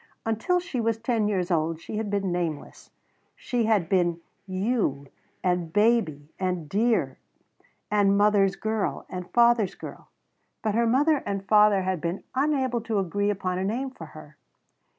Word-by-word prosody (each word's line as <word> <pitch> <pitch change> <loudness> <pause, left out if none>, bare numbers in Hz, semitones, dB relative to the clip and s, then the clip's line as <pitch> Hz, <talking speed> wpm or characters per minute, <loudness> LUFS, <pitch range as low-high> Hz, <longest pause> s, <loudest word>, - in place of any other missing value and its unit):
Until 225 +11 +1
she 340 -9 -3
was 225 0 0
ten 225 -2 0
years 190 -3 -1
old 160 -1 0
she 210 - -6
had 220 -1 -2
been 200 -2 -1
nameless. 170 -4 -4 0.5
She 240 -2 -1
had 210 -6 +2
been 175 -2 +1 0.3
You 185 - -1 0.4
and 180 -3 0
Baby 195 -9 +1
and 180 -4 -2
Dear 220 +7 +1 0.7
and 200 -1 +3
Mother's 205 -2 +3
Girl 220 -1 -2
and 180 -1 -6
Father's 235 -5 +3
Girl, - - -10 0.5
but 215 -2 0
her 230 +2 +2
mother 290 +6 +3
and 200 -6 -4
father 210 -2 +5
had 185 -3 -2
been 170 +3 -3
unable 265 -3 0
to 225 -1 -2
agree 200 +2 0
upon 185 -2 -2
a - - -1
name 250 +7 -2
for 165 -11 -10
her. 155 -1 -14
205 Hz, 155 wpm, -26 LUFS, 180-230 Hz, 0.7 s, father